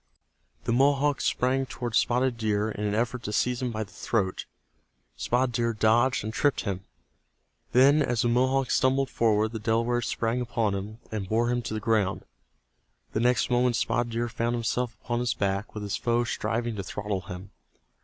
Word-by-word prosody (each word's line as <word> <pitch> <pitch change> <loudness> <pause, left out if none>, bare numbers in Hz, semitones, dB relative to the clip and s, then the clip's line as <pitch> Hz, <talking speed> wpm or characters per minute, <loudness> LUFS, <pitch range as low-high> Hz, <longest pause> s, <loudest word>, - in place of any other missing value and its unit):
The - - -1
Mohawk 140 +2 +3
sprang 130 +1 +1
toward 120 -3 -5
Spotted 125 +2 +2
Deer 110 -1 0
in 105 0 -4
an 105 0 0
effort 120 +2 -1
to 105 - -4
seize 125 +4 0
him 125 - -1
by 110 -1 -3
the 100 - -14
throat. 95 -5 -1 0.7
Spotted 125 - 0
Deer 115 0 0
dodged 115 +4 +3
and 110 +1 -4
tripped 145 +3 +1
him. 95 -3 -3 0.9
Then 140 +5 +5
as 120 -5 +1
the - - +2
Mohawk 130 +2 +2
stumbled 135 +1 +2
forward 110 -1 +2
the 115 - -5
Delaware 115 +2 +1
sprang 115 +1 -1
upon 115 -4 0
him, 100 +3 -5
and 100 -4 -4
bore 120 +2 +2
him 120 0 0
to 115 -2 -4
the - - -1
ground. 105 -3 0 0.9
The - - 0
next 125 +1 +2
moment 125 0 +3
Spotted 120 0 0
Deer 120 +1 0
found 120 +1 -1
himself 120 0 -2
upon 120 +1 -1
his 120 -1 0
back 100 +2 -2
with 105 - -4
his 100 -3 -2
foe 120 +3 +1
striving 115 -1 -2
to 100 - -3
throttle 100 +1 -3
him. 95 +1 -9
115 Hz, 185 wpm, -27 LUFS, 110-125 Hz, 0.9 s, Then